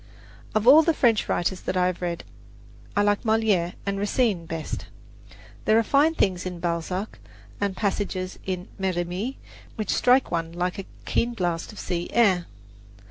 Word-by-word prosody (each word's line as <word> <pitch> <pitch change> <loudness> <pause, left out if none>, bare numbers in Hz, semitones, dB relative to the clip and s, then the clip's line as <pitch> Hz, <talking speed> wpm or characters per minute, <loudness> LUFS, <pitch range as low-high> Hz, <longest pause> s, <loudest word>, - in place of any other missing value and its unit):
Of 215 0 +2
all 295 +5 +10
the 320 0 +2
French 230 -6 +2
writers 180 +2 0
that 185 - -2
I 180 - +3
have 180 -1 -1
read, 175 -1 -3 0.7
I 205 - +4
like 205 0 +2
Moliere 220 -6 +2
and 200 0 -1
Racine 205 -4 +1
best. 165 -1 -5 0.8
There 215 - +5
are 230 - +4
fine 290 +7 +3
things 185 - +1
in 180 -2 -5
Balzac 175 +4 -3 0.4
and 200 -2 -1
passages 190 -3 -2
in 185 0 -4
Merimee 185 +6 -2 0.4
which 215 -4 -2
strike 255 +1 +4
one 165 -1 -2
like 180 +2 -2
a 195 - -5 0.2
keen 235 0 0
blast 175 -3 -2
of 210 - -14
sea 175 -1 -3
air. 190 -7 +3
190 Hz, 160 wpm, -25 LUFS, 175-220 Hz, 0.8 s, all